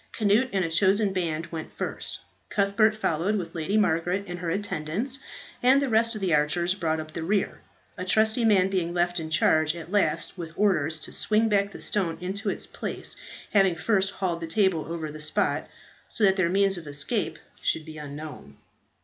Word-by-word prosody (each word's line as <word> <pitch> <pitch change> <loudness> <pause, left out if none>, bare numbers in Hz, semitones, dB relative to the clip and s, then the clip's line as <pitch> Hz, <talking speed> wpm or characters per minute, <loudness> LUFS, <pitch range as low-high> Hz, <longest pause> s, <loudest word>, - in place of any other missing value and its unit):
Cnut 215 +4 +3
and 190 -3 +1
a - - -2
chosen 195 +3 +3
band 165 -3 -1
went 160 -2 -6
first; - - -3 0.3
Cuthbert 210 +2 +2
followed, 180 +1 0
with 175 -5 -4
Lady 175 +5 -1
Margaret 180 0 +1
and 175 0 -6
her 170 -1 -3
attendants; 205 - -2 0.4
and 260 +3 +5
the 280 -1 0
rest 230 0 +4
of 215 - -5
the 185 -4 +1
archers 165 +4 +2
brought 160 -4 -1
up 155 0 -7
the 165 - -4
rear, 195 +4 -1 0.4
a - - -2
trusty 220 +5 +2
man 200 -4 +4
being 180 -3 -1
left 175 0 +1
in 160 -1 -5
charge 155 0 +3
at 170 +1 -9
last 180 -3 0
with 165 -1 -6
orders 160 -7 +2
to - - -7
swing 220 +1 +2
back 200 -1 +2
the - - -10
stone 175 -6 +1
into 195 +4 -3
its - - -3
place, - - -3 0.4
having 195 -4 +4
first 195 +2 +1
hauled 185 -4 -3
the 165 - -4
table 170 -3 +1
over 160 -2 -4
the 155 0 -9
spot, 150 0 0 0.4
so 225 - 0
that 190 -1 +5
their 185 -3 +2
means 195 0 +2
of 165 - -12
escape 140 -1 -1 0.2
should 160 - 0
be 155 -1 -9
unknown. 145 - -9
180 Hz, 190 wpm, -26 LUFS, 160-205 Hz, 0.4 s, and